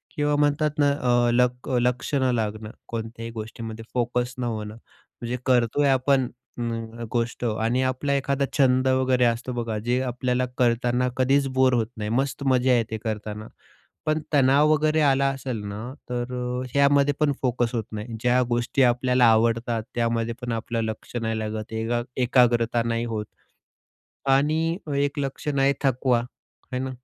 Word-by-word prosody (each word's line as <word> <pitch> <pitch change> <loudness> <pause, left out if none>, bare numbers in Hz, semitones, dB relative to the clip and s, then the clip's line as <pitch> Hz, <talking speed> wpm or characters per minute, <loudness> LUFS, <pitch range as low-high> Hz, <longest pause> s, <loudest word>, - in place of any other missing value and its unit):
किंवा 145 0 +1
म्हणतात 145 +1 +2
ना 145 -1 +4
अ, 120 -3 +2
लक 125 +1 +1
लक्ष 125 +3 -1
न 130 -2 +2
लागणं 110 -1 -3 0.2
कोणत्याही 115 0 -6
गोष्टीमध्ये, 115 0 -7
फोकस 125 +1 -1
न - - -2
होणं. 110 -2 -4 0.5
जे 125 +1 -2
करतोय 125 +2 +3
आपण 130 -1 +2 0.3
म, 120 - -4
न, 115 +1 -6
गोष्ट 120 0 -2
आणि 115 +3 0
आपला 130 +2 0
एखादा 140 0 0
छंद 130 -1 +3
वगैरे 130 -1 +2
असतो 120 +2 0
बघा, 115 -3 -3
जे 125 +2 +1
आपल्याला 125 0 -1
करताना 125 +1 +2
कधीच 135 +2 +3
बोर 130 -1 +4
होत 115 -3 +1
नाही, 105 0 -3
मस्त 135 +3 -1
मजा 130 -1 +3
येते 110 -1 -2
करताना. 110 -1 -4 0.6
पण 155 0 +1
तणाव 140 +2 +5
वगैरे 155 +1 +2
आला 140 -1 +3
असेल 130 -5 -5
ना, 110 +6 -6 0.2
तर 125 0 -3
अ, 125 0 -3
ह्यामध्ये 140 0 +4
पण 150 -2 +3
फोकस 120 -2 0
होत 115 - -1
नाही. 110 +2 -6
ज्या 125 +1 +3
गोष्टी 120 +3 +1
आपल्याला 125 0 +3
आवडतात, 115 0 +1
त्यामध्ये 115 0 0
पण 120 -1 -3
आपलं 115 0 -2
लक्ष 110 +2 -6
नाही 110 -1 -1
लागत, 110 0 -5
एका 115 +2 -1 0.2
एकाग्रता 120 -2 +3
नाही 115 0 -1
होत. 110 -2 -3 1.1
आणि 155 +5 +2 0.2
एक 145 +1 0
लक्षण 140 +1 -2
आहे 135 +1 +4
थकवा. 130 -2 +2
आहे 125 +1 -10
ना? 130 - -3
125 Hz, 160 wpm, -24 LUFS, 115-135 Hz, 1.1 s, तणाव